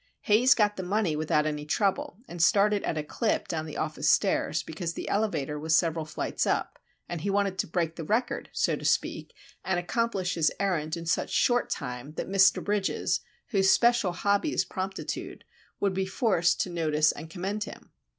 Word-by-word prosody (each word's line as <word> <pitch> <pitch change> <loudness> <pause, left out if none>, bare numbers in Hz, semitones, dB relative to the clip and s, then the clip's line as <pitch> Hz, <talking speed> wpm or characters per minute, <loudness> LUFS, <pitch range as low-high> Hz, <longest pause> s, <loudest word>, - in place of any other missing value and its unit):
Haze 240 +6 +5
got 210 -2 +2
the - - -2
money 190 -3 0
without 155 0 +1
any 150 -1 -2
trouble, 190 +3 0
and 175 -1 -5
started 205 +3 +4
at 160 - -2
a 155 - -1
clip 215 +8 -1
down 160 -1 -3
the 155 - -7
office 155 0 -1
stairs, - - +2
because 165 +1 -5
the - - -5
elevator 155 -9 -1
was 160 +1 +2
several 165 -2 +1
flights 155 - -2
up, - - -1 0.3
and 175 -3 -5
he 200 - -2
wanted 195 -1 0
to - - 0
break 165 -1 -1
the 165 - -4
record, 245 - -1
so - - +1
to - - -9
speak, - - 0 0.3
and 190 -2 0
accomplish 190 -1 -1
his 160 -3 +2
errand 170 -5 -1
in 170 - -7
such 165 - 0
short 245 0 +2
time 125 0 -5
that - - -4
Mr. 195 0 +4
Bridges, 205 -1 0 0.3
whose 195 -3 +3
special 235 -6 +4
hobby 200 - +1
is - - +1
promptitude, 190 0 -5 0.4
would 200 -1 +1
be 190 0 -1
forced 190 -4 +2
to 180 - -2
notice 155 -3 +2
and 160 - -9
commend 195 +5 -3
him. - - -12
180 Hz, 190 wpm, -28 LUFS, 160-205 Hz, 0.4 s, Haze